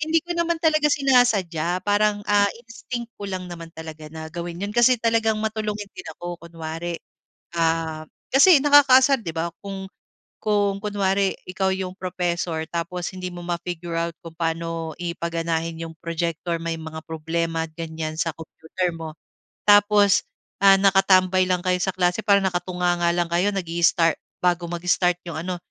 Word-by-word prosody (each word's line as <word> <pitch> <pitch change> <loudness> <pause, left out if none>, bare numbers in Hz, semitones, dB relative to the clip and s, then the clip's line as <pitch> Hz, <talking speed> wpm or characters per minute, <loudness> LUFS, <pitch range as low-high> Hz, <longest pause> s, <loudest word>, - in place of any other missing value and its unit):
Hindi 315 +2 +2
ko 350 - -3
naman 340 0 +1
talaga 310 -2 +3
sinasadya 205 - +2
parang, 205 0 +2
ah, 205 0 +4 0.2
instinct 235 0 -7
ko 200 - -4
lang 185 -1 -4
naman 165 -1 -8
talaga 160 -1 -9
na 160 0 -7
gawin 170 +1 -6
'yon 205 - -4
kasi 240 +1 +5
talagang 225 -1 +2
matulungin 215 -1 -3
din - - -10
ako, 175 0 -6
kunwari. 165 0 -5 0.6
Ah, 160 -1 0 0.2
kasi 280 +2 +7
nakakaasar 275 -3 +6
'di 165 - -4
ba, 165 +1 -2
kung 195 -1 -6 0.5
kung 205 -2 +1
kunwari 200 -2 +1 0.2
ikaw 190 +1 0
'yong 185 -1 -4
professor 175 -3 -2
tapos 175 +1 -3
hindi 185 -1 -6
mo 175 - -8
ma-figure 175 -1 -4
out 170 0 -1
kung 165 -2 -10
paano 165 -1 -2
i 170 -1 -2
paganahin 165 -1 -2
'yong 165 -1 -7
projector, 170 0 -2
may 165 0 -3
mga 160 0 -7
problema 165 +1 -2
ganyan 160 -1 -5
sa 165 -1 -1
computer 165 +2 -4
mo, 160 -1 -7 0.6
tapos, 205 -1 +5 0.4
ah, 195 -1 +7
nakatambay 190 -1 +4
lang 180 -1 +1
kayo 185 0 +2
sa 190 +1 0
klase 180 +3 +1
parang 200 -1 +4
nakatunganga 175 -1 0
lang 175 -1 0
kayo 180 +4 +2
nag-i-start 170 -2 +2 0.3
bago 175 -1 +1
mag-start 180 +1 +1
'yong 160 -2 -4
ano. 180 - -1
180 Hz, 155 wpm, -23 LUFS, 165-205 Hz, 0.6 s, kasi